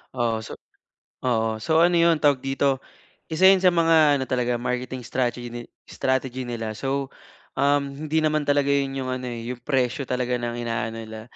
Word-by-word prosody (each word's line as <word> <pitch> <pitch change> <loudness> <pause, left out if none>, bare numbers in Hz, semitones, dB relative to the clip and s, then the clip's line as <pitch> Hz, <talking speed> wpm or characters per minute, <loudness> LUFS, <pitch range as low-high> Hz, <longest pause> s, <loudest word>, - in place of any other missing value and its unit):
Oo, 115 -3 0
so - - -8 0.7
oo, 110 -3 0
so 160 +7 +3
ano 175 0 +4
'yon, 170 -1 +4
tawag 145 -3 +4
dito, 135 0 0 0.5
isa 165 +3 +2
yun 195 - +4
sa 185 0 +5
mga 165 -3 +4
ano 130 - -2
talaga, 125 -1 0
marketing 125 +1 -3
stragety 120 -1 -3 0.2
strategy 130 -1 -2
nila. 115 -2 -4
So, 135 +3 -3 0.5
um, 140 +1 0
hindi 155 +1 +1
naman 155 -1 +1
talaga 145 -1 +2
yun 140 -1 0
yung 130 -1 -3
ano, 130 0 -4
eh, 120 0 -5
yung 125 -1 -8
presyo 130 -1 -1
talaga 125 -1 -1
ng 120 0 -3
inaano 115 -1 -3
nila. 110 0 -9
130 Hz, 175 wpm, -24 LUFS, 120-145 Hz, 0.7 s, sa